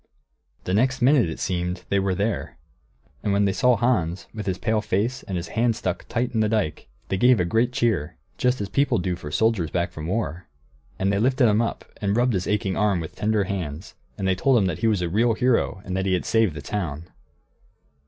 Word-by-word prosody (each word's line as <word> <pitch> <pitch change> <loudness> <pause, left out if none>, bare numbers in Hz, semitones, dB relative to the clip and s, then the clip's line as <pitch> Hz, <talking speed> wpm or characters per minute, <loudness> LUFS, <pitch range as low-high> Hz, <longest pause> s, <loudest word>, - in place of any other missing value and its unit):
The 90 - -2
next 125 +5 +2
minute, 130 - +4
it 80 - -6
seemed, 90 0 -2
they 100 - +2
were 95 -1 0
there. 105 +3 -2 0.6
And 100 - -1
when 100 +1 +3
they 100 - +1
saw 125 +2 +3
Hans, 95 -7 0
with 110 -2 -6
his 95 -1 -1
pale 110 +2 0
face, 115 +7 -1
and 95 - -4
his 85 -1 -5
hand 115 0 +1
tight 115 +7 -2
in 115 - 0
the 110 -1 +2
dike, 105 - -1 0.2
they 95 - 0
gave 125 +2 +5
a 90 - +2
great 115 +7 +1
cheer, 110 - 0 0.2
just 125 0 +2
as 100 - -2
people 130 +5 +1
do 90 -1 -1
for 75 -4 -8
soldiers 100 -1 +1
back 85 +1 -1
from 80 -3 -6
war; 95 -3 -3 0.5
and 95 +1 +1
they 100 - +1
lifted 130 +2 +3
him 105 +1 +3
up 115 - -3 0.2
and 100 +1 +1
rubbed 125 0 +2
his 90 -3 -1
aching 100 -2 0
arm 105 -4 +2
with 80 - -6
tender 105 -1 +1
hands, 90 -3 -5 0.2
and 95 -2 -2
they 95 - +3
told 125 +8 +3
him 100 - +3
that 90 -4 -2
he 115 - +1
was 105 -5 +1
a - - 0
real 110 +6 +2
hero 115 -5 +1
and 95 - -3
that 95 0 -1
he 95 - +2
had 90 - -3
saved 110 -8 +2
the 75 - -7
town. 85 -3 -4
100 Hz, 225 wpm, -24 LUFS, 90-115 Hz, 0.6 s, gave